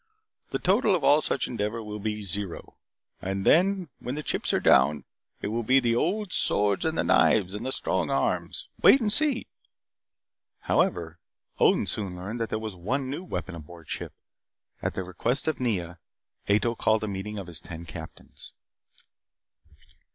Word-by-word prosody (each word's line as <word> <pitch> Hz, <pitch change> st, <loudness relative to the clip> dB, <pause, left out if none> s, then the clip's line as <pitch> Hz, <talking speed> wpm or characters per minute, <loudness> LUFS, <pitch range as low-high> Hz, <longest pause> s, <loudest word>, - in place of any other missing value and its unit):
The -, -, -1 dB
total 200 Hz, +2 st, +3 dB
of 175 Hz, -, -2 dB
all 150 Hz, +2 st, +5 dB
such 135 Hz, -, 0 dB
endeavor 115 Hz, 0 st, -3 dB
will 105 Hz, 0 st, -6 dB
be 105 Hz, 0 st, -3 dB
zero. 100 Hz, -1 st, -4 dB, 0.5 s
And 95 Hz, +1 st, -3 dB
then, 185 Hz, +1 st, +4 dB
when 125 Hz, +3 st, -4 dB
the 150 Hz, -, -4 dB
chips -, -, -1 dB
are -, -, +2 dB
down, 70 Hz, +3 st, +4 dB, 0.4 s
it -, -, -1 dB
will 115 Hz, +2 st, -1 dB
be 130 Hz, +4 st, +4 dB
the 120 Hz, -2 st, +1 dB
old 190 Hz, -, 0 dB
swords 100 Hz, +3 st, +2 dB
and 160 Hz, 0 st, 0 dB
the -, -, +2 dB
knives 95 Hz, +2 st, +3 dB
and 105 Hz, -, -5 dB
the 130 Hz, -, -2 dB
strong -, -, 0 dB
arms. -, -, -1 dB
Wait 275 Hz, -, +8 dB
and 210 Hz, -4 st, +1 dB
see 295 Hz, -5 st, +3 dB, 0.6 s
" -, -, -61 dB
However, 85 Hz, -1 st, +1 dB, 0.4 s
Odin -, -, +4 dB
soon 100 Hz, -4 st, -3 dB
learned 100 Hz, +7 st, -6 dB
that 115 Hz, -, -2 dB
there -, -, -1 dB
was 110 Hz, -1 st, -5 dB
one 130 Hz, +10 st, -2 dB
new 150 Hz, +6 st, -4 dB
weapon 100 Hz, -, -5 dB
aboard 85 Hz, 0 st, -11 dB
ship. -, -, -5 dB, 0.7 s
At -, -, -2 dB
the 95 Hz, -, -2 dB
request 105 Hz, -, -1 dB
of 155 Hz, -5 st, 0 dB
Nea, 90 Hz, -9 st, -2 dB, 0.5 s
Ato 105 Hz, +3 st, +3 dB
called 110 Hz, -1 st, +1 dB
a -, -, -1 dB
meeting 100 Hz, +1 st, -5 dB
of 100 Hz, -, -5 dB
his 85 Hz, -4 st, -5 dB
ten 85 Hz, 0 st, -9 dB
captains. 80 Hz, -1 st, -11 dB
105 Hz, 175 wpm, -27 LUFS, 95-135 Hz, 0.7 s, Wait